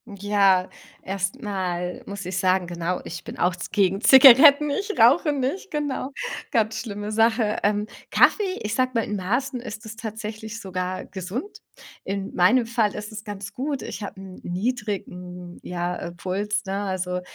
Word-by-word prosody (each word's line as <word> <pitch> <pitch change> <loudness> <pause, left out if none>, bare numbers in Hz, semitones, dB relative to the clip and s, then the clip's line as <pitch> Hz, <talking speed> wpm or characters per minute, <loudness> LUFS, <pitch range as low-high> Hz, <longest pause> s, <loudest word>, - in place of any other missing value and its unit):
Ja, 195 -2 +3 0.3
erst 195 +7 -3
mal 180 -4 -3
muss 200 -2 -7
ich 185 0 -3
sagen, 185 0 +2
genau, 175 +1 -3
ich 170 0 -8
bin - - -8
auch 180 +1 +2
ze 180 - -6
gegen 195 -2 +2
Zigaretten. 275 +4 +8
Ich 405 +9 -2
rauche 285 +6 +5
nicht, 280 +9 -2
genau. 285 -3 -3 0.4
Ganz 220 -3 +1
schlimme 205 -2 -5
Sache. 225 0 +2
Ähm, 210 +1 +1 0.2
Kaffee, 390 -3 +3
ich 210 - -2
sage 255 0 +1
mal, 230 -2 +1
in 210 - -3
Maßen 245 +8 -1
ist 215 -3 -8
es 220 0 -9
tatsächlich 220 0 -6
sogar 185 -1 -4
gesund. 220 - -6 0.5
In 195 0 -4
meinem 230 +8 +4
Fall 225 -3 0
ist 210 0 -6
es 215 0 -8
ganz 205 -1 -6
gut. 275 +1 -3
Ich - - -6
habe 200 -1 -7
'n 190 -1 -10
niedrigen, 180 -4 -4
ja, 175 0 -3
äh, 170 - -6
Puls, 205 +4 -2
ne? 195 +1 -2
Also, 185 -2 -2
205 Hz, 165 wpm, -24 LUFS, 185-240 Hz, 0.5 s, Zigaretten